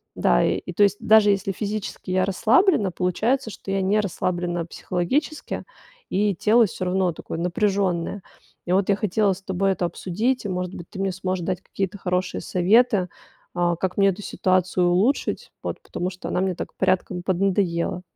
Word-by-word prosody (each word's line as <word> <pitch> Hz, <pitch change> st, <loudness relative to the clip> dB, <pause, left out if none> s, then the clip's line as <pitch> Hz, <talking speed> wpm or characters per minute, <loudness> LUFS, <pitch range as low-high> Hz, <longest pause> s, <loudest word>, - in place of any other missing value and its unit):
Да, -, -, +3 dB
и, -, -, -2 dB
то 205 Hz, -, +4 dB
есть, 200 Hz, 0 st, +4 dB
даже 215 Hz, -1 st, +6 dB
если 195 Hz, 0 st, 0 dB
физически 205 Hz, -1 st, -4 dB
я 185 Hz, 0 st, +2 dB
расслаблена, 220 Hz, -, +3 dB
получается, 220 Hz, +9 st, 0 dB
что -, -, -10 dB
я 195 Hz, 0 st, +1 dB
не 200 Hz, +3 st, +2 dB
расслаблена 175 Hz, -3 st, -1 dB
психологически, 255 Hz, -, -2 dB, 0.5 s
и 205 Hz, +1 st, +1 dB
тело 220 Hz, +6 st, +4 dB
всё 185 Hz, -, -5 dB
равно 185 Hz, 0 st, +1 dB
такое 165 Hz, -, -7 dB
напряжённое. 190 Hz, 0 st, 0 dB, 0.4 s
И, 175 Hz, -, -3 dB
вот, 190 Hz, 0 st, +2 dB
я 200 Hz, -, +5 dB
хотела 205 Hz, -1 st, +1 dB
с 185 Hz, -, -10 dB
тобой 195 Hz, +1 st, 0 dB
это 175 Hz, -, -2 dB
обсудить. 210 Hz, +8 st, -1 dB
И, -, -, -2 dB
может 180 Hz, 0 st, -3 dB
быть, 170 Hz, -, -9 dB
ты 195 Hz, -, -9 dB
мне 195 Hz, 0 st, 0 dB
сможешь 185 Hz, -1 st, -3 dB
дать 185 Hz, -1 st, -2 dB
какие-то 195 Hz, +1 st, -4 dB
хорошие 180 Hz, -1 st, -1 dB
советы, 195 Hz, +1 st, +3 dB, 0.5 s
а, 175 Hz, -1 st, +1 dB
как 185 Hz, +1 st, -2 dB
мне 195 Hz, -1 st, +5 dB
эту 190 Hz, +2 st, -4 dB
ситуацию 185 Hz, -2 st, +1 dB
улучшить. 200 Hz, +11 st, +1 dB
Вот, -, -, -4 dB
потому 180 Hz, +1 st, -4 dB
что 185 Hz, -, -8 dB
она 180 Hz, -, 0 dB
мне 190 Hz, -1 st, 0 dB
так -, -, -6 dB
порядком 185 Hz, -1 st, 0 dB
поднадоела. 185 Hz, -2 st, 0 dB
190 Hz, 175 wpm, -23 LUFS, 180-205 Hz, 0.5 s, даже